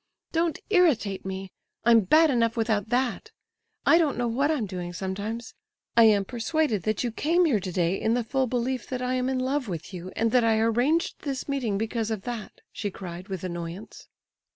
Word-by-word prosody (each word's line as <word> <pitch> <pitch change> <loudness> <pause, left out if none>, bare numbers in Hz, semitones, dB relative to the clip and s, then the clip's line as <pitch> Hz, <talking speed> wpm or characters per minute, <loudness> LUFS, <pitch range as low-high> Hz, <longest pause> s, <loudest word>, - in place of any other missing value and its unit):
"Don't 330 -1 +1
irritate 260 - +2
me—I'm 195 +4 0
bad 310 - +5
enough 230 -2 +1
without 220 -2 0
that—I 265 - -1
don't 305 -5 +1
know 245 -1 0
what 270 +6 +1
I 315 - +2
am 240 -7 -1
doing 180 -2 -5
sometimes. 200 +6 -4 0.4
I 230 -1 +7
am 205 -3 +4
persuaded 245 - 0
that 215 - 0
you 240 - -1
came 335 +9 +2
here 260 -10 +2
today 180 -1 -1
in 225 +1 +2
the 245 - 0
full 260 +3 0
belief 250 0 -2
that 255 -1 -3
I 250 0 0
am 255 0 0
in 265 - 0
love 260 +1 -1
with 175 0 -6
you, 180 +1 -7
and 225 0 +1
that 250 0 +4
I 225 -1 +3
arranged 245 +9 +1
this 275 -3 -4
meeting 255 -8 -1
because 225 +1 -2
of 215 -4 -3
that," 240 -3 -6
she 205 - -3
cried, 185 -1 -8
with 190 -3 -5
annoyance. 175 +2 -6
230 Hz, 190 wpm, -26 LUFS, 200-260 Hz, 0.4 s, I